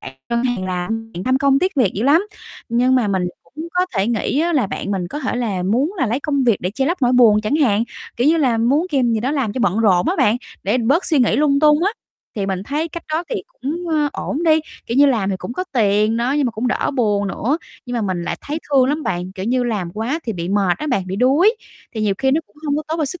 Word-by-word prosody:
bạn 135 - -9 0.2
ngân 235 +1 +1
hàng 245 -7 -1
làm, 220 +5 -3
bạn 175 - -5
tham 260 +1 +2
công 275 0 +3
tiếc 370 +2 0
việc 230 -8 +3
dữ 210 - -2
lắm. 320 +9 +4 0.4
Nhưng 250 +3 +2
mà 240 -5 +2
mình 190 -2 0 0.3
cũng 320 +2 -5
có 360 +1 +2
thể 195 +2 +2
nghĩ 240 +5 0
á, 340 +1 +1
là 265 -9 +2
bạn 195 - -5
mình 180 -3 -2
có 295 - -5
thể 255 -4 -2
là 210 -7 -2
muốn 250 - +1
là 260 - +1
lấy 240 +6 -1
công 280 -3 0
việc 230 -5 +4
để 180 - -2
che 265 +5 -1
lấp 340 -2 -2
nỗi 245 0 +3
buồn 225 -4 +5
chẳng 215 +8 0
hạn, 230 -7 +2 0.3
kiểu 245 +4 +1
như 330 - +4
là, 255 -8 +2
muốn 275 +9 +2
kìm 250 -5 +2
gì 220 - 0
đó 260 +4 -1
làm 265 -8 -1
cho 255 - -3
bận 200 -1 +1
rộn 190 -6 +3
á 370 - 0
bạn, 240 -6 +3 0.3
để 205 +6 +1
bớt 275 +10 +2
suy 315 -4 +2
nghĩ 245 -4 +3
lung 285 -1 +3
tung 300 +1 +4
á, 400 - +3 0.5
thì 200 -2 -1
mình 190 -1 -2
thấy 300 +8 -2
cách 335 +1 -7
đó 330 +3 0
thì - - -2
cũng, 350 - -5
ơ, 300 -2 +1
ổn 305 +5 -3
đi, 315 -1 +4 0.3
kiểu 235 - -2
như, 285 - +7
làm 215 -7 +1
thì 190 - -1
cũng 235 - -6
có 365 - -3
tiền 215 -2 +2
đó, 240 +3 0
nhưng 290 -1 +1
mà - - -1
cũng 230 +3 -2
đỡ - - 0
buồn 205 -4 +1
nữa. 265 - -1 0.3
Nhưng 245 - -4
mà 230 - -1
mình 185 -3 -2
lại 175 - -3
thấy 300 +2 -4
thương 265 -2 +5
lắm 300 +2 -1
bạn, 180 +1 -3
kiểu 190 0 -6
như, 250 +2 +1
làm 205 -8 -2
quá 230 - -2
thì 225 - -2
bị 170 -2 -4
mệt 195 -3 +1
á 305 - -4
bạn, 200 -10 0
bị 190 +1 -4
đuối, 300 - +4 0.4
thì 220 - -3
nhiều 205 -2 +1
khi 265 0 +2
nó 310 +4 +2
cũng - - -32
hông 290 0 +1
có 305 - -2
tốt 320 - -1
cho 310 - +1
sức 315 +5 -6
245 Hz, 285 wpm, -19 LUFS, 205-290 Hz, 0.5 s, như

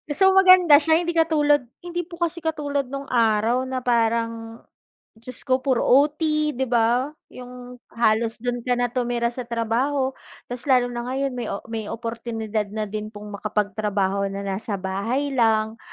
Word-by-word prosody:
So 385 0 +5
maganda 370 -6 +7
siya 320 +2 +2
hindi 345 - -1
katulad 295 -5 +2 0.2
hindi 350 -1 -4
po 345 - -10
kasi 340 0 -2
katulad 290 -4 -2
nung 275 +1 -7
araw 230 +2 +2
na 260 -1 -4
parang, 230 -1 -1 0.6
Diyos 240 +2 -11
ko 255 0 +3
puro 260 -3 +1
OT 290 +4 +3 0.4
'di 265 +1 -1
ba, 240 +2 +2 0.2
yung 250 0 -11
halos 225 0 +1
do'n 245 +1 -2
ka 250 0 +1
na 245 -1 -1
tumira 240 -1 -1
sa 245 -1 -7
trabaho, 250 +4 0 0.4
tas 250 +4 -7
lalo 250 -2 +3
na 240 0 -5
ngayon 270 +1 -1
may 240 -3 -4
o 200 - -5
may 220 -2 -4
oportunidad 225 -2 -4
na 215 0 -3
din 215 +1 -5
pong 210 -1 -10
makapagtrabaho 200 -1 -1
na 195 0 -5
nasa 200 +2 -3
bahay 200 +9 -2
lang. 220 -3 +1
245 Hz, 160 wpm, -23 LUFS, 220-275 Hz, 0.6 s, maganda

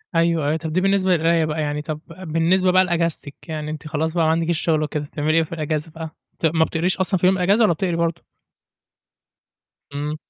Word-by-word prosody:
أيوه 165 -2 +2
أيوه. 155 +2 +1
طب 160 -1 -5
دي 185 - +2
بالنسبة 195 -1 +2
للقراية 165 -1 +3
بقى 155 0 -2
يعني 150 0 -2
طب 155 0 -5
بالنسبة 180 +2 +1
بقى 185 +1 +5
لاجازتِك، 170 -4 -2
يعني 155 -1 -4
أنتِ 155 0 -7
خلاص 160 +1 -1
بقى 170 -2 +1
ما 160 - +3
عندكيش 165 0 0
شغل 155 -2 +1
وكده، 150 0 -3
بتعملي 155 +2 -1
إيه 165 - +4
في 160 - -11
الاجازة 155 0 -3
بقى؟ 160 -1 -7 0.3
ت - - -1
ما 160 0 +3
بتقريش 175 +5 -1
أصلًا 190 -1 0
في 180 - +1
يوم 190 0 +3
الاجازة 195 +5 +3
والّا 210 -6 +5
بتقري 175 +1 -1
برضو؟ 170 -1 -1 1.7
امم. 145 +2 -3
165 Hz, 210 wpm, -21 LUFS, 155-175 Hz, 1.7 s, بقى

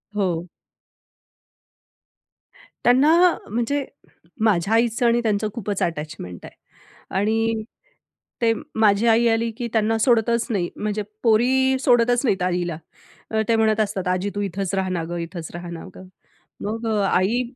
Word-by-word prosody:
हो. 180 -4 -1 2.4
त्यांना 260 +6 +5 0.2
अ, - - -5
म्हणजे 240 +5 -1 0.6
माझ्या 200 -1 +2
आईचं 235 +1 +2
आणि 235 0 +3
त्यांचं 215 -1 0
खूपच 205 -4 -4
अटॅचमेंट 150 - -5
आहे. - - -12 0.6
आणि 225 +1 0 0.8
ते 225 -1 +4 0.3
माझी 215 +1 +4
आई 230 +1 +4
आली 230 0 +1
की 240 -2 -3
त्यांना 225 0 +2
सोडतच 235 -1 +2
नाही, 185 -6 -1
म्हणजे 210 0 -2 0.2
पोरी 260 +4 +3
सोडतच 245 -1 +3
नाहीत 190 -5 +1
आईला. 175 -3 -1 0.5
अ, 220 0 +1
ते 230 - +3
म्हणत 220 -1 +2
असतात, 195 -3 -1
"आजी 185 +2 0
तू 205 - -1
इथंच 195 0 -3
रहा 190 -1 -1
ना 175 -3 -2
गं, 175 - -3
इथंच 170 -1 -6
रहा 175 0 -7
ना 170 -1 -7
गं." 185 - -12 0.6
मग 225 +2 -3
अ, 215 -2 +1
आई 205 +7 +2
215 Hz, 145 wpm, -22 LUFS, 185-235 Hz, 2.4 s, त्यांना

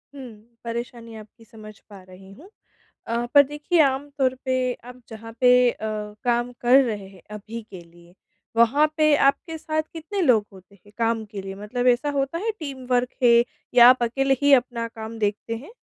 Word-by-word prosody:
हुँ, 235 -3 -13
परेशानी 235 -1 -7
आपकी 215 +2 -15
समझ 215 -1 -14
पा 200 -2 -13
रही 190 +1 -15
हूँ। 320 - -15 0.6
अ, 235 +1 -2
पर 285 - +9
देखिए, 295 +4 -1
आम 275 +1 0
तौर 260 -1 +1
पे 260 -1 0 0.3
आप 250 0 -12
जहाँ 225 0 -10
पे 250 -1 +6 0.2
अ, - - -11 0.5
काम 240 0 0
कर 250 +3 +5
रहे 205 -4 -5
हैं 190 -2 -17
अभी 220 +2 -8
के 185 -3 -10
लिए, 170 +1 -20 0.4
वहाँ 275 +7 +4
पे 305 -1 +4
आपके 320 +4 0
साथ 310 0 -2
कितने 335 +5 -5
लोग 225 -9 +3
होते 190 +1 -17
हैं, 205 +2 -22
काम 230 -1 0
के 205 -2 -8
लिए? 195 0 -7
मतलब 215 +5 -4
ऐसा 250 +4 +2
होता 275 +5 -2
है, 450 +4 -2
टीम 270 -4 -7
वर्क 245 0 +2
है 235 -1 +5 0.3
या 240 0 +9
आप 255 -1 +4
अकेले 270 +3 +1
ही 285 0 +4
अपना 235 -2 -6
काम 225 0 -9
देखते 210 +2 -2
हैं? 285 - -12
235 Hz, 190 wpm, -23 LUFS, 215-270 Hz, 0.6 s, पर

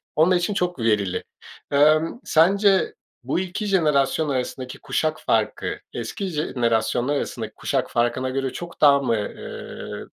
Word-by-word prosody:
onlar 165 +4 +4
için 175 +3 0
çok 180 -5 -1
verili. 105 -5 +1 0.5
Emm, 155 +7 +3
sence 195 +4 +4 0.3
bu 135 +7 -1
2 185 +3 -3
jenerasyon 155 -5 +2
arasındaki 130 -1 -3
kuşak 155 0 -1
farkı, - - 0
eski 200 - -4
jenerasyonlar 125 -4 0
arasındaki - - -4
kuşak - - -1
farkına 120 +2 0
göre 135 0 -2
çok 175 -1 -8
daha 140 -2 +7
mı, 130 -4 0
eee, 105 - -7
150 Hz, 130 wpm, -23 LUFS, 130-175 Hz, 0.5 s, daha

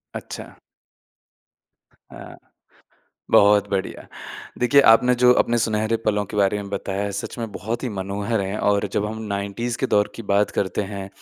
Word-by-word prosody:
अच्छा। - - -8 1.4
हाँ। - - -13 0.9
बहुत 105 0 +5
बढ़िया। 95 -1 -3 0.5
देखिए 125 +3 +5
आपने 125 +2 +5
जो 125 0 +7
अपने 120 0 -1
सुनहरे 110 0 0
पलों 105 -1 +1
के 105 - -8
बारे 100 0 +2
में 100 - -9
बताया 100 0 -3
सच 100 0 -6
में 115 -2 -4
बहुत 110 +5 -4
ही 130 - -2
मनोहर 100 +2 -3
है 100 +2 -3
और 100 0 +1
जब 105 - 0
हम 110 +1 -5
90s 100 +4 -3
के 130 - 0
दौर 105 -3 +2
की 115 - -7
बात 100 +1 +2
करते 95 +1 -1
हैं। 100 -1 -6
105 Hz, 160 wpm, -22 LUFS, 100-115 Hz, 1.4 s, जो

